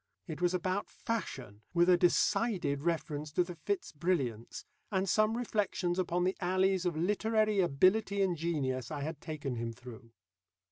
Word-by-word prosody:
It 160 0 -7
was 180 +1 +2
about 185 +3 -1
Fashion, 130 - -5
with 175 0 +5
a 180 - +7
decided 175 -3 +2
reference 155 -2 -2
to 180 - +3
the 175 0 -7
Fitz 185 +5 -3
Brilliants, 140 -9 -2 0.3
and 190 -1 0
some 215 +4 +2
reflections 195 -6 -1
upon 180 -1 0
the 185 +1 +1
alleys 185 0 +1
of 170 -3 -2
literary 215 +3 +1
ability 190 +5 +3
and 185 -2 +1
genius 140 -7 -2
I 150 -2 -4
had 150 +1 -5
taken 145 -6 -4
him 115 0 -3
through. 115 -1 -12
175 Hz, 155 wpm, -32 LUFS, 145-190 Hz, 0.3 s, a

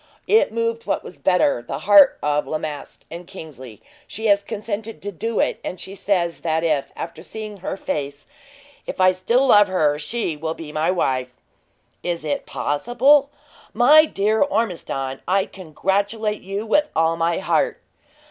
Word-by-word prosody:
It 440 - +3
moved 230 0 -2
what - - -1
was - - -12
better 180 -9 +2
the 120 - -5
heart 200 -1 +6
of 150 0 0
La 155 - -1
Masque; 150 -2 -7
and, 170 +1 -8
Kingsley, 130 - -11 0.2
she 220 - -7
has 200 -2 +4
consented 215 +1 -5
to 205 - -3
do 225 +5 -3
it; - - 0
and 180 - -5
she 190 - -8
says 180 -4 -1
that 160 -1 0
if, 155 -4 0
after 165 -1 -7
seeing 215 +3 -7
her 190 +1 -5
face, 140 -5 -4 0.7
I 185 0 +6
still 230 +9 +1
love 205 -5 +6
her, 155 -6 +1
she 170 +1 -3
will 160 +2 -4
be 155 -2 -9
my 155 +3 0
wife." 130 -8 -1 0.7
"Is 170 -3 -3
it 150 - -2
possible? 265 - +2 0.5
My 295 +7 +7
dear 215 -5 0
Ormiston, 175 - -1
I 190 +1 +2
congratulate 200 +5 -2
you 195 +3 -4
with 300 +7 +2
all 165 +1 +2
my 165 0 0
heart!" - - 0
185 Hz, 160 wpm, -21 LUFS, 155-220 Hz, 0.7 s, My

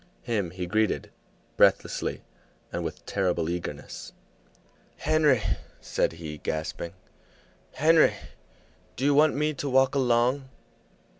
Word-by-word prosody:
Him 105 -7 -1
he 90 +1 -5
greeted, 110 +3 0 0.5
breathlessly - - +2 0.5
and - - -2
with - - -6
terrible 90 -4 0
eagerness. 90 0 -6 0.8
"Henry," 150 -7 +3 0.4
said - - 0
he, 80 -2 -7
gasping, 80 +2 -4 0.8
"Henry, 160 +2 +5 0.8
do 130 - -2
you 145 - +4
want 150 +2 +5
me 150 +2 +1
to 140 0 -4
walk 130 +1 +4
along?" 130 +1 +2
120 Hz, 105 wpm, -27 LUFS, 90-145 Hz, 0.8 s, Henry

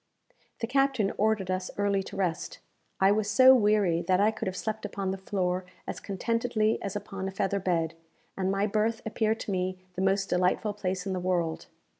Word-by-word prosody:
The - - +1
captain 265 -4 +1
ordered 210 -3 +1
us 185 0 -2
early 200 -1 +1
to - - -9
rest. 180 -4 -2 0.4
I 195 +1 +5
was 205 0 +1
so 255 +5 +8
weary 205 -7 +3
that 185 -1 +3
I 210 +2 +4
could 220 - -5
have 185 0 -3
slept 220 +2 -3
upon 195 -1 -3
the - - -2
floor 185 -1 -1 0.2
as - - -5
contentedly 225 +2 0
as 200 0 -4
upon 200 -2 -4
a - - -3
feather 195 +1 -1
bed, 170 -4 0 0.4
and 190 -1 -1
my 195 +1 +1
berth 220 +2 0
appeared 220 0 0
to - - -4
me 185 0 -1 0.2
the 185 - -4
most 195 0 +2
delightful 185 +4 +1
place 185 -2 -3
in 195 - -2
the 185 - -2
world. 175 -3 -1
195 Hz, 195 wpm, -28 LUFS, 185-215 Hz, 0.4 s, so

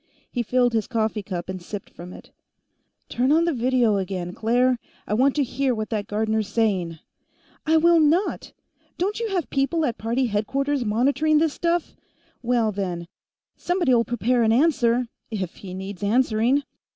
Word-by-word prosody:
He 245 - -1
filled 245 +1 +1
his 220 -2 0
coffee 220 -3 -1
cup 180 -3 -5
and 185 -1 -5
sipped 195 +3 -8
from 175 +1 -10
it. - - -13 0.8
"Turn 255 +3 0
on 325 +2 +4
the 340 - +1
video 245 -4 +2
again, 185 -2 -3
Claire. 245 +3 +2 0.3
I - - -3
want 260 +5 +3
to 295 - +2
hear 260 0 -1
what 215 0 -4
that 210 -2 -2
Gardner's 220 0 -1
saying." 195 -6 0 0.7
"I 320 +1 +5
will 335 +1 +5
not! 320 +6 +1 0.5
Don't 400 +5 -1
you 460 -1 -2
have 365 -5 -2
people 295 +4 +1
at 235 - -3
party 235 +4 0
headquarters 270 +6 -1
monitoring 275 +8 +2
this 310 -1 +2
stuff? 340 -1 -1 0.5
Well, 235 -3 +1
then. 180 -4 -4 0.5
Somebody'll 310 -10 +2
prepare 240 +1 0
an 220 -1 +3
answer, 245 -3 +2 0.2
if 195 -6 -4
he 185 -2 -8
needs 190 0 -7
answering." 235 +4 +2
235 Hz, 165 wpm, -24 LUFS, 210-275 Hz, 0.8 s, I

